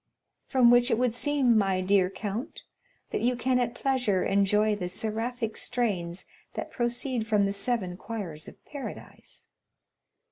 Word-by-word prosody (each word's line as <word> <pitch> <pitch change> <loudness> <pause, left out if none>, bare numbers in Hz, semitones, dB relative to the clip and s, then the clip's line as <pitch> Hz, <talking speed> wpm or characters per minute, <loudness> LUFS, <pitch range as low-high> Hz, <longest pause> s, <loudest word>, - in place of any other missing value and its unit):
"From 250 -3 +5
which 245 +1 +5
it 225 - +2
would 245 -1 +2
seem, 270 -2 +2
my 195 -3 +2
dear 185 0 +3
count, 205 - -5 0.5
that - - -1
you 245 +1 +2
can 250 +1 +1
at 240 -1 -1
pleasure 250 -9 +1
enjoy 210 +2 +3
the 180 -3 -4
seraphic 225 +3 -3
strains 190 -7 -2 0.3
that - - -4
proceed 240 -1 -1
from 210 -2 +3
the 200 - 0
seven 200 -3 -1
choirs 190 -9 -5
of - - -14
paradise?" 285 -3 -8
225 Hz, 145 wpm, -28 LUFS, 195-245 Hz, 0.5 s, From